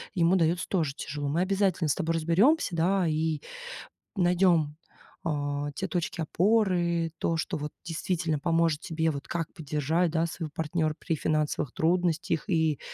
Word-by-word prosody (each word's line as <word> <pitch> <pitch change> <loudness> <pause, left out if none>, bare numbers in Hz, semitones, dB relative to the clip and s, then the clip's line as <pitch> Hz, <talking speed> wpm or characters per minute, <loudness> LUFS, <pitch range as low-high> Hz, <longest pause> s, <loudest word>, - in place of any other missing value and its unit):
ему 175 +1 +4
дается 170 +1 +1
тоже 160 -8 0
тяжело. 145 0 -4
Мы 165 +4 +1
обязательно 190 -3 +1
с - - +2
тобой 165 -3 -1
разберемся, 185 - +3
да, 185 +2 +2
и 155 -1 0 0.7
найдем, 175 -4 +3 0.5
а, 145 -2 -1
те - - -2
точки 175 -1 -2
опоры, 175 -3 +2
то, 165 -1 0
что 160 +1 -2
вот 150 0 -5
действительно 165 -1 -1
поможет 165 -1 +1
тебе, 160 -2 0
вот 140 -1 -6
как 165 -2 -3
поддержать, 160 +2 0
да, 165 0 +1
своего 165 -2 -6
партнера 160 -1 -1
при 165 - -1
финансовых 150 -3 -1
трудностях 165 -2 +1
и 160 -4 +2
165 Hz, 150 wpm, -28 LUFS, 155-175 Hz, 0.7 s, ему